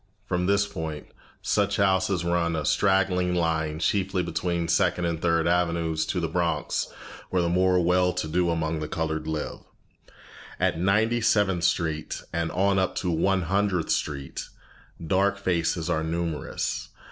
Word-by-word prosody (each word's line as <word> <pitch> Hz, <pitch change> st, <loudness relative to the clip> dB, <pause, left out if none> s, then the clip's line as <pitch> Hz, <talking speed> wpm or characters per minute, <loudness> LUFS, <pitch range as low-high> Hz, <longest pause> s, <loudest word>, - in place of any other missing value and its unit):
From 90 Hz, -2 st, -1 dB
this 100 Hz, +1 st, +3 dB
point, 80 Hz, -5 st, -5 dB, 0.4 s
such 100 Hz, -1 st, +1 dB
houses 95 Hz, -2 st, +2 dB
run, 85 Hz, -1 st, +1 dB
a 80 Hz, -2 st, -2 dB
straggling 90 Hz, -2 st, +2 dB
line, 80 Hz, -2 st, 0 dB
chiefly 95 Hz, +2 st, 0 dB
between 85 Hz, -2 st, -2 dB
Second 90 Hz, +1 st, +2 dB
and 85 Hz, -1 st, -2 dB
Third 85 Hz, -1 st, +2 dB
Avenues, 85 Hz, -2 st, +1 dB
to 90 Hz, -, -1 dB
the 85 Hz, -, -1 dB
Bronx 85 Hz, -2 st, -1 dB, 0.4 s
where 90 Hz, -1 st, +1 dB
the -, -, +1 dB
more 90 Hz, +1 st, +3 dB
well 90 Hz, +1 st, +3 dB
to 90 Hz, -3 st, -2 dB
do 85 Hz, +2 st, +1 dB
among 80 Hz, -1 st, -1 dB
the 75 Hz, -, -4 dB
colored 80 Hz, 0 st, -3 dB
live. 80 Hz, -1 st, -3 dB, 1.0 s
At -, -, +1 dB
Ninety 110 Hz, +6 st, +2 dB
seventh 95 Hz, -6 st, +2 dB
Street, 80 Hz, -3 st, -1 dB
and 85 Hz, 0 st, -1 dB
on 95 Hz, +1 st, +2 dB
up 95 Hz, -, 0 dB
to 90 Hz, -, -1 dB
One 95 Hz, +3 st, +1 dB
Hundredth 95 Hz, -1 st, 0 dB
Street, 70 Hz, -2 st, -3 dB, 0.6 s
dark 100 Hz, +4 st, +2 dB
faces 85 Hz, -3 st, 0 dB
are 80 Hz, -3 st, 0 dB
numerous. 80 Hz, -3 st, -3 dB
85 Hz, 150 wpm, -26 LUFS, 80-95 Hz, 1.0 s, this